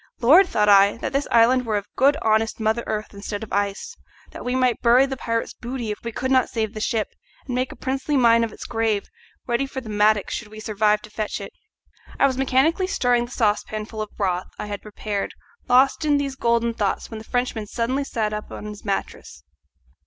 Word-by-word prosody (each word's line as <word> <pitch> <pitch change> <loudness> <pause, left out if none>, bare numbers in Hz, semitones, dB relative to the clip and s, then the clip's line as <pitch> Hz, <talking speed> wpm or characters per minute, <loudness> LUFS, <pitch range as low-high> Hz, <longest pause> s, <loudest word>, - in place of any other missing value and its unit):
Lord! 325 +11 +6
thought 210 -10 +1
I, 200 +1 +6
that 245 - -4
this 275 +1 0
island 240 +2 +4
were 220 -3 0
of 200 - -4
good 280 +3 +4
honest 220 0 +1
mother 220 +2 0
earth 215 0 -3
instead 205 +1 -5
of 220 - -9
ice, 200 0 -2 0.4
that - - -9
we 250 +1 -1
might 255 -2 +1
bury 245 +3 +5
the 270 -1 -4
pirate's 230 -3 -2
booty 240 -2 -5
if 210 - -5
we 235 - -4
could 260 +3 -3
not 260 -2 +3
save 220 -2 -2
the 215 - -6
ship, 220 -1 0 0.4
and 255 - -5
make 255 +1 -1
a - - -10
princely 270 +2 -1
mine 230 -2 +5
of 230 - -2
its - - -10
grave, 225 -3 -1 0.4
ready 240 +3 0
for 265 - -5
the 235 -4 -9
mattock 210 0 +2
should 235 - -4
we 215 +1 -11
survive 210 -1 +1
to - - -12
fetch 215 0 -3
it! 200 - -8 0.7
I - - +5
was 265 -2 +2
mechanically 270 +8 +2
stirring 245 -8 +1
the 240 - -14
saucepan 215 -2 0
full 220 0 -6
of 215 - -4
broth 185 -3 -1
I - - -5
had 205 -1 -5
prepared, 210 -1 -4 0.3
lost 260 +5 +4
in 295 -1 +3
these 280 -1 -2
golden 235 -2 +1
thoughts, 205 0 -2
when 220 - -6
the - - -10
Frenchman 245 -2 -2
suddenly 255 +6 -1
sat 220 -5 -2
up 210 0 -6
on - - -7
his 210 -1 -8
mattress. 195 - -4
230 Hz, 220 wpm, -23 LUFS, 210-255 Hz, 0.7 s, Lord